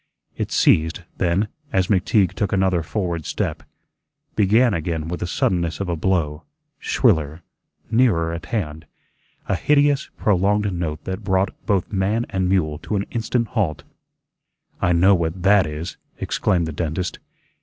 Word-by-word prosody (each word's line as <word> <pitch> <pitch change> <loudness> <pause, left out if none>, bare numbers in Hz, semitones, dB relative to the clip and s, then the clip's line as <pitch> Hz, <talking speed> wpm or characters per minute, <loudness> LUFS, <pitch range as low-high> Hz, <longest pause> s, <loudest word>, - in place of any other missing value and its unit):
It - - -3
ceased; 80 +3 +3
then, 90 +4 +1 0.2
as 95 -6 +2
McTeague 95 0 +2
took 105 -5 -1
another 95 -3 +2
forward 85 -2 -3
step, - - -2 0.7
began 110 +3 +4
again 80 -1 -2
with 90 +1 -4
the 90 - -3
suddenness 85 -3 0
of 100 - -3
a 85 - 0
blow, 80 -3 0 0.4
shriller, 80 - +1 0.5
nearer 100 -9 +3
at 85 0 -6
hand, 80 -9 -3 0.6
a - - +1
hideous, 145 +5 +2
prolonged 105 0 +2
note 80 -3 -3
that 95 +3 -5
brought 95 -1 +1
both 100 -1 +1
man 105 +5 +1
and 95 -1 0
mule 80 -6 +1
to 105 - -3
an 100 - 0
instant 115 0 -1
halt. 80 - -1 1.0
"I 90 - +2
know 90 +3 +5
what 85 0 -1
THAT 100 -3 +5
is," 75 +3 -6 0.2
exclaimed 85 -3 0
the 80 - -5
dentist. 85 +3 -3
90 Hz, 145 wpm, -22 LUFS, 80-100 Hz, 1.0 s, know